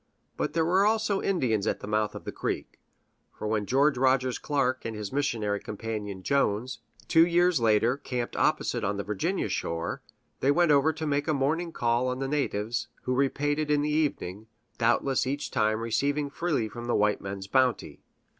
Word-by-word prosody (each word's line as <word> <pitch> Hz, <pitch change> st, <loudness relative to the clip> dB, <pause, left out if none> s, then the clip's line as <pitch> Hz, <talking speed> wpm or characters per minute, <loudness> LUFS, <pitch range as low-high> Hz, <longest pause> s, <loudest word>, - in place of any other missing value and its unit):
But -, -, -2 dB
there 165 Hz, 0 st, +2 dB
were 185 Hz, +4 st, +3 dB
also 215 Hz, -1 st, +1 dB
Indians 120 Hz, -, 0 dB
at -, -, -1 dB
the -, -, -6 dB
mouth 105 Hz, 0 st, 0 dB
of -, -, -7 dB
the -, -, -5 dB
creek; -, -, -4 dB, 0.6 s
for -, -, -6 dB
when 105 Hz, -1 st, -1 dB
George 140 Hz, 0 st, +3 dB
Rogers 130 Hz, -1 st, +2 dB
Clark 130 Hz, -3 st, 0 dB
and 115 Hz, -1 st, -4 dB
his 105 Hz, +2 st, -6 dB
missionary 110 Hz, -8 st, 0 dB
companion, 105 Hz, -3 st, -5 dB
Jones, 130 Hz, -2 st, 0 dB, 0.3 s
two 165 Hz, -1 st, +6 dB
years 175 Hz, -2 st, +3 dB
later 115 Hz, +3 st, +3 dB
camped 125 Hz, -4 st, -4 dB
opposite -, -, +1 dB
on 100 Hz, +1 st, -1 dB
the 100 Hz, -, -2 dB
Virginia 105 Hz, -, -1 dB
shore, 85 Hz, 0 st, -3 dB, 0.4 s
they 135 Hz, -, +1 dB
went 160 Hz, +2 st, +4 dB
over 145 Hz, +2 st, +4 dB
to 160 Hz, 0 st, -5 dB
make 145 Hz, -1 st, 0 dB
a 155 Hz, -, +2 dB
morning 160 Hz, +5 st, 0 dB
call 120 Hz, -2 st, +1 dB
on 125 Hz, 0 st, -1 dB
the 135 Hz, 0 st, -2 dB
natives, 120 Hz, -5 st, -1 dB, 0.2 s
who 125 Hz, -, -1 dB
repaid 145 Hz, +3 st, +1 dB
it 155 Hz, -1 st, -1 dB
in 145 Hz, -1 st, +2 dB
the 150 Hz, -, 0 dB
evening, 110 Hz, -, -1 dB, 0.3 s
doubtless 125 Hz, +3 st, +2 dB
each 140 Hz, +2 st, -3 dB
time 110 Hz, +1 st, +1 dB
receiving 140 Hz, +5 st, 0 dB
freely 150 Hz, -8 st, -1 dB
from 120 Hz, +2 st, -8 dB
the 120 Hz, -, 0 dB
white 105 Hz, 0 st, +2 dB
men's 95 Hz, 0 st, -6 dB
bounty. 130 Hz, +4 st, 0 dB
130 Hz, 185 wpm, -28 LUFS, 110-150 Hz, 0.6 s, two